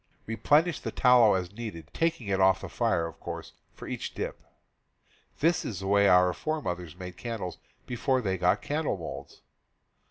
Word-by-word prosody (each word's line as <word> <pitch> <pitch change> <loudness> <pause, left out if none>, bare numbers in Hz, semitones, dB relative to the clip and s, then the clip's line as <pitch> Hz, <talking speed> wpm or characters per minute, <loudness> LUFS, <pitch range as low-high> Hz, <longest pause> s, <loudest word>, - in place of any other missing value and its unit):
Replenish 145 +9 +2
the - - -4
tallow 125 -5 +5
as 90 -1 -2
needed, 100 -9 -7
taking 165 -7 0
it 95 -1 0
off 95 0 +4
the - - -6
fire, 95 -9 +1
of 85 - -8
course, - - -7 0.2
for - - -9
each - - -5
dip. - - -4 1.0
This 165 +3 +3
is 100 -5 -5
the - - -5
way 100 +1 +4
our 90 -1 +5
fore 155 - -2
mothers 90 - -5
made 90 -1 -8
candles 110 -7 -5 0.3
before 130 +2 0
they 95 -6 -1
got 90 0 +2
candle 150 -7 -1
molds. 85 - -8
100 Hz, 170 wpm, -28 LUFS, 90-125 Hz, 1.0 s, tallow